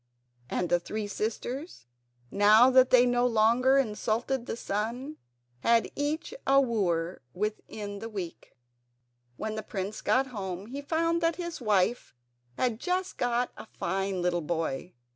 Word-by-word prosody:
And 175 - -1
the 175 0 +3
three 210 +5 -4
sisters, 230 - -4 0.5
now 215 +5 +6
that 260 0 +6
they 250 -1 +6
no 245 0 +3
longer 240 +4 +4
insulted 235 +1 -1
the - - -3
sun, 235 +9 -3 0.4
had 230 - +3
each 300 +8 -2
a 275 0 +6
wooer 185 -9 0
within 205 0 -4
a 225 - -5
week. 185 - -7 0.8
When 220 0 -3
the 215 - -3
prince 200 0 -5
got 265 +1 +2
home 190 -2 -4
he 270 +6 -6
found 330 +3 0
that 330 0 +2
his 345 -5 -5
wife 210 - +1 0.4
had 240 -3 0
just 370 +3 -2
got 245 0 +1
a - - -10
fine 190 0 -1
little 175 -1 +1
boy. 165 0 -3
225 Hz, 140 wpm, -29 LUFS, 200-260 Hz, 0.8 s, now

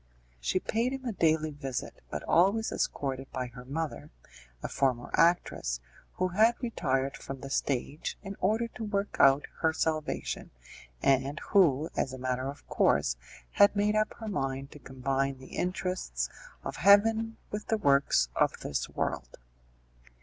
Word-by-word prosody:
She 185 - 0
paid 235 +6 0
him 265 -1 -6
a 240 - -1
daily 160 -4 +2
visit, 135 -3 -5
but - - -4
always 200 +6 +3
escorted 135 -1 -2
by 130 -1 -2
her 125 -1 -9
mother, 155 +4 -4 0.5
a - - -1
former 130 -3 0
actress, 165 - +2 0.3
who 185 0 0
had 220 +6 +4
retired 135 - -1
from 135 -1 -8
the 135 - -7
stage 140 +2 -2
in 195 0 -6
order 220 +5 +1
to 230 - -8
work 205 -1 -2
out 135 +1 +6
her 160 - +3
salvation, 155 -1 -2 0.5
and 135 +2 +2
who, 160 -6 +4
as 130 - -1
a - - -5
matter 130 +1 -2
of 140 - -10
course, - - +2 0.4
had 205 +1 +5
made 205 +1 +2
up 215 0 +1
her 220 - -8
mind 135 -7 -2
to 150 - -11
combine 135 +1 -1
the 130 - -11
interests 180 - -2 0.3
of - - -5
heaven 220 +5 +5
with 210 0 -4
the 220 - +2
works 140 - +3
of - - +3
this 70 - -2
world. - - -3
155 Hz, 155 wpm, -30 LUFS, 135-205 Hz, 0.5 s, out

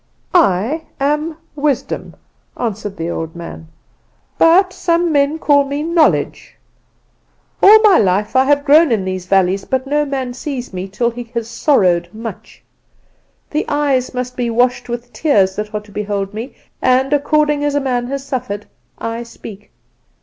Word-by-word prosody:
"'I 280 - +2 0.2
am 300 +3 -1 0.2
Wisdom,' 285 -3 -2 0.4
answered 210 -3 -4
the 165 +1 -3
old 160 0 -5
man; 170 -1 -9 0.7
'but 370 +3 +5
some 340 0 +1
men 285 +1 +2
call 290 -3 +3
me 280 +2 -3
Knowledge. 330 -1 +1 1.1
All 430 +2 +9
my 410 -4 +6
life 205 +3 +1
I 260 0 +5
have 285 +1 +2
grown 305 0 +5
in 205 -5 +1
these 185 -1 -4
valleys; 195 0 +2
but 260 0 -2
no 295 +2 +1
man 265 -3 -3
sees 255 -3 -6
me 185 +1 -4
till 235 +5 -1
he 240 +1 -7
has 230 -1 -2
sorrowed 185 - +2
much. 225 +1 -9 0.9
The 300 - 0
eyes 280 -3 0
must 250 0 -4
be 245 -2 -1
washed 245 +1 +1
with 240 0 -6
tears 195 -12 +2
that 210 0 -4
are 210 -1 -3
to 210 0 -18
behold 200 -1 -3
me; 230 +5 -7 0.3
and, 260 +2 +2
according 295 0 +2
as 290 -1 0
a - - +3
man 250 -3 -1
has 275 +1 -4
suffered, 210 -6 -4 0.3
I 230 +1 -4
speak. 220 -3 -11
250 Hz, 155 wpm, -17 LUFS, 210-290 Hz, 1.1 s, All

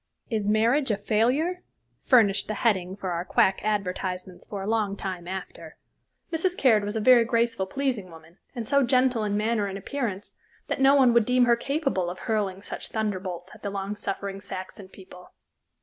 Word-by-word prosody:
"Is 215 -3 -1
Marriage 235 +7 +2
a 210 - +1
Failure?" 255 - +1 0.4
furnished 210 -6 +4
the 215 - -3
heading 190 -5 0
for 190 -2 -4
our 170 0 -2
quack 190 +1 +2
advertisements 185 -3 -3
for 200 -2 -5
a - - -5
long 210 -3 0
time 185 -3 -5
after. 180 -4 -7 0.6
Mrs. 360 +3 +1
Caird 225 -6 +4
was 205 +2 -4
a - - 0
very 240 +2 +6
graceful, 230 -4 0
pleasing 250 -7 -2
woman, 165 +1 -16 0.2
and 235 -3 -4
so 280 0 +3
gentle 255 -2 +2
in 205 -1 0
manner 215 -1 0
and 195 0 -5
appearance 205 -2 -4 0.3
that - - -2
no 270 +1 +6
one 260 -4 +5
would 235 -2 +4
deem 250 +1 +3
her 240 0 +4
capable 275 - -1
of 180 - -6
hurling 200 -3 -2
such - - -6
thunderbolts 190 -4 -3
at 215 - -15
the 200 - -3
long 200 +1 -4
suffering 195 -1 -4
Saxon 190 0 -8
people. 185 -2 -14
210 Hz, 180 wpm, -26 LUFS, 190-240 Hz, 0.6 s, very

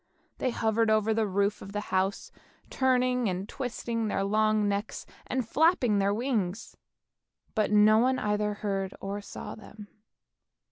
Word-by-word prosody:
They 255 - 0
hovered 225 -1 +1
over 215 0 +3
the 220 -1 +1
roof 200 +2 0
of 195 - -9
the 210 - -1
house, 190 +1 0 0.4
turning 250 -3 +2
and 185 +2 -3
twisting 235 -3 -3
their 195 -1 -1
long 215 +1 +2
necks, 200 +2 -3 0.2
and 255 -3 -2
flapping 265 - +3
their 200 0 +2
wings; 220 -3 -2 0.8
but 215 -2 0
no 210 +1 +6
one 260 +2 +2
either 210 -1 -1
heard 195 -2 -3
or 200 +1 -4
saw - - -8
them. 210 -1 -12
215 Hz, 145 wpm, -28 LUFS, 200-230 Hz, 0.8 s, no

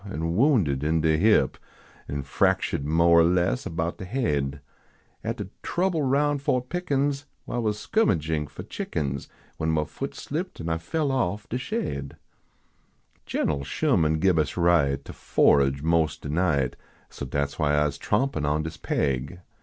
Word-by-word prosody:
An 85 -4 -3
wounded 100 - +3
in 80 +1 +2
de 80 0 +3
hip, 90 -5 +3 0.5
En 70 -1 -3
fractuah - - +1
d 70 - -6
mo 85 +2 +4
er 85 0 +7
less 90 +7 +1
about 80 +1 -3
de 95 - -5
haid, 75 - -1 0.6
At - - -2
de - - -5
trouble 180 -2 0
roun 145 +2 +2
I - - -18
o 125 - +3
t 125 - -10
Pickens. 145 -5 -1 0.2
I 120 - -2
was 105 -3 0
skirmagin 80 - 0
for 70 - -8
chickens 70 -3 -3 0.3
When 80 - -1
mah 80 -1 +2
foot - - -6
slipt 175 +6 -5
an 85 - -4
I 80 0 0
fell 145 - -1
off 110 -5 -1
de 125 - -2
shaid. 125 - -4 1.1
Gen - - 0
l 70 -2 -3
Sherman 80 +3 +1
gib 85 0 +3
us 75 +2 -1
right 80 -6 +3
To - - -8
forage 70 0 +3
mos" 80 -1 +2
de - - -8
night, 75 -5 +1 0.4
So - - -7
dat 70 -1 -1
s - - -14
why 75 -2 +2
Ise 70 -2 -3
trompin 105 - 0
on 75 +1 +1
dis 80 - -6
paig. 70 +6 -1
80 Hz, 175 wpm, -26 LUFS, 75-120 Hz, 1.1 s, er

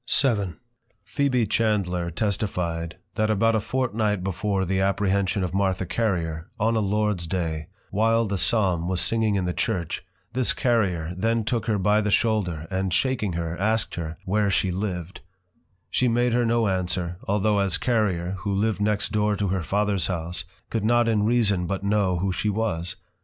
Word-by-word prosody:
VII. 100 - +1 0.5
Phebe 130 -5 +1
Chandler 100 -5 0
testify'd, 85 -3 -2 0.2
that 110 -1 0
about 115 +2 +3
a 110 - +2
Fortnight 110 -4 -1
before 95 +1 -1
the 95 +1 0
apprehension 100 0 +1
of 90 -1 -3
Martha 95 -1 +1
Carrier, 85 -6 -1
on 115 +2 +2
a - - +2
Lords 105 -3 0
day, 80 -3 -2 0.2
while 115 +2 +3
the 100 -1 -2
Psalm 95 -7 +2
was 90 -1 0
singing 110 0 +2
in 95 -2 0
the 90 - -1
Church, 90 -7 -2 0.3
this 125 0 +2
Carrier 90 -9 +1
then 115 +4 +1
took 110 0 -1
her 110 -2 +2
by 105 +3 +3
the 105 - -1
shoulder 100 -8 +1
and 95 0 -1
shaking 105 0 +1
her, 85 0 -3
asked 110 +2 0
her, 80 -2 -5
where 105 +2 +1
she 95 -1 +1
lived: 90 -2 -4 0.7
she 125 - +2
made 120 0 +2
her 120 -1 +2
no 115 -1 +2
Answer, 90 -2 -1
although 105 +1 +2
as 95 -3 +2
Carrier, 95 -6 0
who 100 +1 -3
lived 105 +1 0
next 105 0 0
door 105 -1 +1
to 100 -2 -1
her 95 -1 0
Fathers 100 +1 0
House, 90 +1 -3 0.3
could 115 -3 -1
not 120 +1 +3
in 105 -2 +2
reason 105 -7 +2
but 95 +1 -3
know 100 -3 +2
who 95 +2 0
she 105 +3 -1
was. 95 -4 -1
100 Hz, 175 wpm, -25 LUFS, 90-110 Hz, 0.7 s, about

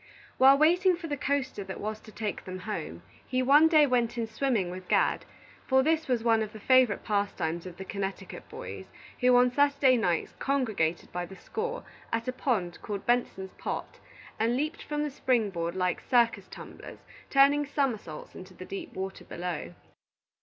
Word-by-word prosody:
While 270 +1 +8
waiting 355 +5 +4
for 340 0 -8
the 295 -3 -2
coaster 270 -6 -2
that 190 0 -7
was 215 +1 -4
to 215 - -14
take 210 -1 -4
them 185 0 -6
home, 85 - -5 0.2
he 255 0 -1
one 290 +5 +7
day 310 -2 +6
went 240 -3 0
in 230 - 0
swimming 220 -5 -1
with 185 0 -8
Gad; - - +2 0.4
for 265 0 +4
this 320 +2 +1
was 245 -3 0
one 225 -1 +3
of 215 0 -4
the 215 - -9
favorite 255 -1 +4
pastimes 195 -5 -1
of 175 -1 -10
the 190 - -7
Connecticut 195 0 -5
boys, - - -8 0.3
who 250 -1 +5
on 245 0 +5
Saturday 280 -1 +4
nights 175 -7 0
congregated 220 - 0
by 175 0 -4
the 190 - -11
score 465 - -4 0.3
at 230 +1 -2
a 255 - -1
pond 205 -10 -1
called 205 -2 -5
Benson's 235 -6 0
Pot, - - -5 0.4
and 230 +3 +2
leaped 305 +4 -2
from 295 0 -2
the 300 - -3
spring 245 -6 +1
board 170 -1 -3
like 180 -1 0
circus 235 -2 +2
tumblers, - - -11 0.2
turning 285 +1 +4
somersaults 235 - -3
into 185 0 -11
the 185 - -9
deep 195 - -7
water 190 0 -5
below. 170 - -5
235 Hz, 180 wpm, -28 LUFS, 190-275 Hz, 0.4 s, While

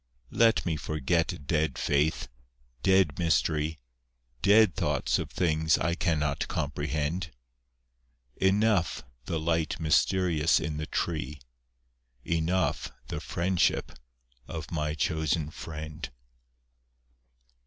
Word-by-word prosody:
Let 115 -1 +3
me 80 -3 0
forget 75 0 -1
dead 75 -3 0
faith, 75 +2 +1 0.5
dead 95 -2 +3
mystery, 80 -2 +1 0.6
Dead 105 -2 +5
thoughts - - 0
of - - -4
things 80 -3 +2
I 85 +3 0
cannot 80 -5 0
comprehend. 75 +3 -2 1.1
Enough 100 -1 +2 0.2
the 80 - -2
light 80 0 0
mysterious 85 0 +3
in 75 -1 -3
the 75 0 -4
tree, 75 -3 -2 0.9
Enough 85 +3 0 0.2
the - - -4
friendship 90 +1 0 0.6
of - - -6
my 75 -1 -1
chosen 80 +1 0
friend. 80 -3 -7
80 Hz, 95 wpm, -28 LUFS, 75-85 Hz, 1.1 s, Dead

